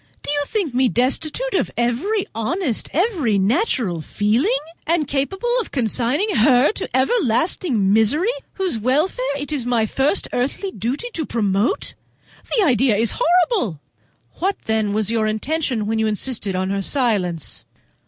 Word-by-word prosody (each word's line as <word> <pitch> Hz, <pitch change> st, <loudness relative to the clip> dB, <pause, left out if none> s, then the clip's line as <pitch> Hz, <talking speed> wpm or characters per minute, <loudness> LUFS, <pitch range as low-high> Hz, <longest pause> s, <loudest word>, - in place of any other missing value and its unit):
Do -, -, -3 dB
you 290 Hz, 0 st, +1 dB
think 385 Hz, -, -2 dB
me 255 Hz, 0 st, +3 dB
destitute 305 Hz, -, 0 dB
of 385 Hz, -, +1 dB
every 275 Hz, -, 0 dB
honest, 255 Hz, -, -2 dB
every 320 Hz, -, +1 dB
natural 210 Hz, -, +1 dB
feeling? 235 Hz, -, +1 dB, 0.3 s
Am 335 Hz, 0 st, +2 dB
I -, -, 0 dB
capable 340 Hz, -, -1 dB
of -, -, -8 dB
consigning 255 Hz, -, 0 dB
her 250 Hz, -, +5 dB
to 400 Hz, -, -5 dB
everlasting 260 Hz, -, +1 dB
misery 290 Hz, -, +3 dB, 0.2 s
whose 370 Hz, -, -2 dB
welfare 270 Hz, -, 0 dB
it 285 Hz, +1 st, -6 dB
is 285 Hz, -5 st, -1 dB
my 235 Hz, -3 st, +2 dB
first 270 Hz, -, 0 dB
earthly 280 Hz, +10 st, -2 dB
duty 255 Hz, -, -3 dB
to 320 Hz, -, -2 dB
promote? 205 Hz, 0 st, 0 dB, 0.6 s
The 430 Hz, -, +4 dB
idea 250 Hz, -5 st, +3 dB
is 225 Hz, +2 st, +1 dB
horrible!" 350 Hz, -, +2 dB, 0.6 s
"What, 385 Hz, +2 st, 0 dB
then, 220 Hz, -2 st, 0 dB
was 215 Hz, 0 st, 0 dB
your 225 Hz, -2 st, +1 dB
intention 245 Hz, +1 st, -1 dB
when 220 Hz, +1 st, -1 dB
you 220 Hz, -, +2 dB
insisted 210 Hz, -2 st, -2 dB
on 190 Hz, +1 st, -1 dB
her 200 Hz, 0 st, -1 dB
silence?" 195 Hz, -, -1 dB
255 Hz, 150 wpm, -20 LUFS, 220-335 Hz, 0.6 s, her